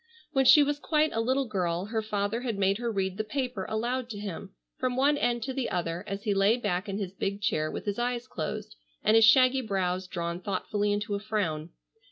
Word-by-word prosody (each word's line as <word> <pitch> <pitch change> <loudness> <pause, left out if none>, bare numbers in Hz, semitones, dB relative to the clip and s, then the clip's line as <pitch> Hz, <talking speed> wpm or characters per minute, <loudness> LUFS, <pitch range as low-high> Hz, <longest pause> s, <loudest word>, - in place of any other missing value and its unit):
When 270 -2 +2
she 295 +3 +8
was 290 0 -1
quite 305 0 +2
a 225 - -1
little 260 +4 +1
girl 180 -5 -1
her 220 +1 -2
father 215 +1 -2
had 235 -5 -2
made 195 +1 +2
her 240 -1 -1
read 190 -2 -2
the 215 - -1
paper 250 -4 -3
aloud 240 +3 -2
to 215 - -6
him, 200 -1 -6 0.3
from 255 -2 0
one 280 +3 +3
end 240 -4 0
to 265 - -3
the 260 -1 -2
other, 170 0 -2
as 200 +1 -4
he 210 - +1
lay 200 +4 +3
back 200 -3 -2
in 195 - -2
his 195 -3 -4
big 200 +1 -2
chair 180 -8 0
with - - -6
his 205 +1 -2
eyes 245 0 -1
closed - - -5 0.3
and 215 - +4
his 225 -1 +8
shaggy 255 +2 +6
brows 185 -4 -1
drawn 170 -1 -3
thoughtfully 205 +2 -1
into 205 0 -1
a 200 - -1
frown. 185 -7 -2
210 Hz, 225 wpm, -28 LUFS, 195-245 Hz, 0.3 s, she